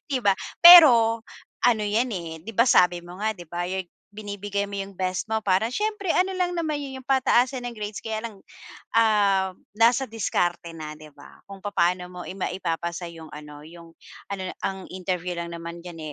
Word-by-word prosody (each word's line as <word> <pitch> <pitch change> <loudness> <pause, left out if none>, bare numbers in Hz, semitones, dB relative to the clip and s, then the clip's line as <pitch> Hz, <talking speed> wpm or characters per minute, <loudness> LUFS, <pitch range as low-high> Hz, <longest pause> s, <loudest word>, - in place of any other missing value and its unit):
di 265 - +1
ba? 200 -5 +3 0.2
Pero 240 -11 +9 0.4
ano 230 -3 +3
'yan, 230 +4 0
eh, 160 -2 -7
di 225 - -7
ba, 235 +4 +4
sabi 180 -6 +4
mo 180 +1 -11
nga, 220 - +1
di 175 -2 -12
ba, 175 +2 -4
your 190 -1 -3
g - - -46 0.2
binibigay 205 -1 -4
mo 200 - -6
yung 195 0 -5
best 185 0 -2
mo 220 0 0
para 210 +3 +1
siyempre 420 -1 -1
ano 375 +1 +1
lang 360 -1 0
naman 320 -4 -2
yun 270 -2 -6
yung 260 - -21
pataasan 260 -1 +2
ng 245 - -4
grades 210 -2 -6
kaya 220 -1 -3
lang, 220 -4 -9 0.5
um, 205 -4 +3 0.3
nasa 240 +4 +3
diskarte 175 -6 -2
na, 155 -2 -8
di 155 0 -14
ba? - - -17
Kung 195 -1 -12
papaano 180 -3 0
mo 180 0 -10
ima 185 0 -4
maipapasa 170 -1 -4
yung 160 -1 -11
ano, 150 -1 -11
yung 170 0 -14 0.4
ano 190 -2 -4
na - - -7
ang 190 -1 -4
interview 180 -1 -4
lang 170 0 -5
naman 170 +1 -8
diyan, 175 -2 -9
195 Hz, 195 wpm, -24 LUFS, 175-230 Hz, 0.5 s, Pero